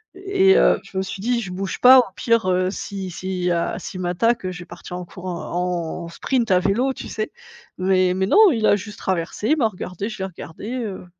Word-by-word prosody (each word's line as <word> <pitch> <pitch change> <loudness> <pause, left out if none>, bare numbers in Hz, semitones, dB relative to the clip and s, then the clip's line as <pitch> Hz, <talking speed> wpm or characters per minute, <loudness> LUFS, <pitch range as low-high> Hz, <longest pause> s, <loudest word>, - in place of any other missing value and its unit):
et 385 0 +3
heu, - - +4
je 190 - -9
me - - +2
suis 190 0 -6
dit: 240 +1 0
«Je 190 -5 -6
bouge 190 +1 -4
pas 255 +1 +9
au - - +5
pire, 230 +1 +1
heu, 185 +1 +1
si 195 -3 -5
si, 180 0 -3
heu, 170 -1 0
s'il 185 - -7
m'attaque, 185 +5 0
heu, 185 - -2
je 180 - -9
vais 175 - -9
partir 175 +1 -9
en 180 - -5
courant, 180 0 -7 0.5
en - - -8
sprint 235 +6 -1
à 180 - +5
vélo» 235 +8 +1
tu - - -8
sais, 215 0 -4 0.4
mais 185 0 +2
mais 190 +1 0
non, 425 - +7
il 225 -3 0
a 205 - +5
juste 205 +1 -9
traversé, 185 +4 -2
il 310 - +4
m'a 235 - +3
regardée, 185 -1 -5
je 215 -3 -7
l'ai 190 - -2
regardé, 190 +4 -8
heu, 220 -8 -4
190 Hz, 230 wpm, -22 LUFS, 180-230 Hz, 0.5 s, pas